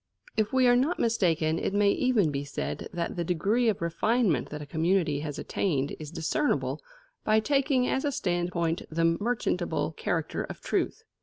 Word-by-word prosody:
If 215 Hz, -1 st, +1 dB
we 260 Hz, -1 st, +4 dB
are 245 Hz, -, +6 dB
not 275 Hz, +8 st, +2 dB
mistaken, 165 Hz, -8 st, +1 dB
it 195 Hz, -, -2 dB
may 205 Hz, 0 st, +4 dB
even 220 Hz, -, +2 dB
be 140 Hz, 0 st, -2 dB
said 75 Hz, -, -4 dB
that 170 Hz, -2 st, -3 dB
the 170 Hz, -, 0 dB
degree 200 Hz, +8 st, +1 dB
of 200 Hz, -5 st, -1 dB
refinement 180 Hz, -, +1 dB
that 150 Hz, -, -6 dB
a -, -, -8 dB
community 160 Hz, 0 st, +1 dB
has 145 Hz, -1 st, -5 dB
attained 145 Hz, -8 st, -1 dB
is 155 Hz, -2 st, -7 dB
discernible 170 Hz, -, -1 dB, 0.4 s
by 215 Hz, 0 st, +4 dB
taking 270 Hz, +1 st, +2 dB
as 265 Hz, -, 0 dB
a 290 Hz, -, +1 dB
standpoint 175 Hz, -6 st, -1 dB
the 165 Hz, +1 st, +1 dB
merchantable 175 Hz, -2 st, 0 dB
character 165 Hz, -1 st, -2 dB
of -, -, -8 dB
truth. -, -, -1 dB
175 Hz, 170 wpm, -28 LUFS, 160-225 Hz, 0.4 s, are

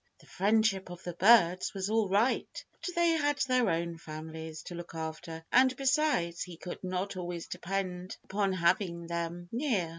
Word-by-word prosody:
The -, -, -20 dB
friendship 205 Hz, -1 st, +2 dB
of 175 Hz, 0 st, -9 dB
the 175 Hz, -, -4 dB
birds 185 Hz, -1 st, +5 dB
was 190 Hz, 0 st, -1 dB
all 220 Hz, -2 st, +1 dB
right, 210 Hz, +7 st, +1 dB, 0.2 s
but 360 Hz, -, -4 dB
they 340 Hz, 0 st, +4 dB
had 290 Hz, -3 st, +1 dB
their 255 Hz, -4 st, +3 dB
own 170 Hz, 0 st, -1 dB
families 160 Hz, 0 st, -7 dB
to -, -, -8 dB
look 175 Hz, -1 st, -8 dB
after, 160 Hz, 0 st, -6 dB
and 260 Hz, +1 st, +5 dB
besides, 270 Hz, -, +1 dB
he 180 Hz, -2 st, -5 dB
could 180 Hz, +2 st, -7 dB
not 185 Hz, +2 st, -2 dB
always 175 Hz, -2 st, -4 dB
depend 185 Hz, -1 st, -4 dB
upon 200 Hz, -1 st, 0 dB
having 170 Hz, -1 st, +1 dB
them 170 Hz, +1 st, -4 dB
near. 230 Hz, -, 0 dB
185 Hz, 170 wpm, -31 LUFS, 170-220 Hz, 0.2 s, birds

